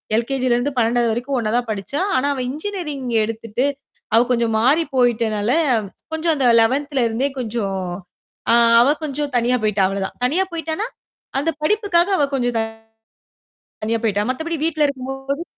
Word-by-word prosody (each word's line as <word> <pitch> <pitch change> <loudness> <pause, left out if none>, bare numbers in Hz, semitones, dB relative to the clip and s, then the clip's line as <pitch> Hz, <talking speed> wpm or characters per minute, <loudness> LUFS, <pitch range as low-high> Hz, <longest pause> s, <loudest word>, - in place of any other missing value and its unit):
L 230 +1 +1
K 270 - 0
G 255 - +1
ல 240 - +4
இருந்து 270 +4 -1
12வது 235 0 +2
வரைக்கும் 250 +4 -2
ஒண்ணா 215 -2 -1
தான் 245 - -1
படிச்சா. 210 - -3 0.2
ஆனா 265 +2 +1
அவ 260 - -3
இன்ஜினியரிங் 300 -3 -4 0.2
எடுத்துட்டு 225 +3 -2 0.5
அவ - - +7
கொஞ்சம் 235 -2 +1
மாறிப் 290 +6 +2
போயிட்டனால, 225 -3 +1 0.6
கொஞ்சம் 320 0 +1
அந்த 265 -3 +1 0.2
11த்ல 270 +2 +1
இருந்தே 250 +5 -1
கொஞ்சம் 215 -5 -2 0.7
அ - - +6 0.3
அவ 250 - +4 0.2
கொஞ்சம் 290 0 -3
தனியா 245 +1 +2
போயிட்டா, 210 -2 +2
அவ்ளோ 195 0 -3
தான். - - -11
தனியா 355 +9 +1
போயிட்டான்னா, 330 +6 -3 0.5
அந்த 300 +4 +1
படிப்புக்காக 385 0 +2
அவ 290 - +3
கொஞ்சம் 245 -3 0 1.3
தனியா 225 +2 +1
போயிட்டா. 205 -2 +1
மத்தபடி 320 +5 -3
வீட்டுல 310 -2 +2
இருக்கும்போது 270 +2 -4
255 Hz, 160 wpm, -20 LUFS, 230-295 Hz, 1.3 s, அவ